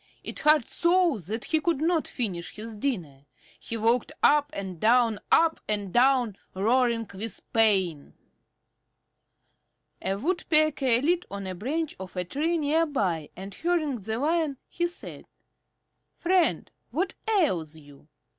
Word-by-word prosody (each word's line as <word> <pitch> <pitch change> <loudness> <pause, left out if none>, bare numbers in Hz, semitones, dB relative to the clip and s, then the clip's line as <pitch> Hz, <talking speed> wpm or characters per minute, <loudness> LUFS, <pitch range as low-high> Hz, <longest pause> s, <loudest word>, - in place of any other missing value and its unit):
It - - -6
hurt 300 -4 +4
so 345 - +2
that 210 +7 -4
he 315 -1 +1
could 335 -3 0
not 325 0 +1
finish 185 -9 -4
his 220 +1 -6
dinner. 170 - -3 0.3
He 230 - -5
walked 230 +5 +1
up 295 0 +5
and 190 -4 -6
down, 230 0 +3
up 325 0 +4
and 205 -3 -2
down, 245 -4 +3 0.2
roaring 230 +2 +2
with 205 +1 -3
pain. 190 -9 +2 1.9
A 190 - -1
Woodpecker 305 - +2
lit 345 +3 +1
on 200 0 -6
a 185 - -4
branch 290 - -3
of 190 -1 -9
a 180 0 -2
tree 315 - -1
near 315 +2 +2
by, 180 - -1
and 195 +1 -8
hearing 320 - 0
the 220 +1 -4
Lion, 305 0 0
she 345 0 0
said, 350 - -10 0.9
"Friend, 365 -1 +1 0.2
what 370 +3 -1
ails 190 - +1
you?" 145 -1 -16
240 Hz, 135 wpm, -27 LUFS, 195-315 Hz, 1.9 s, up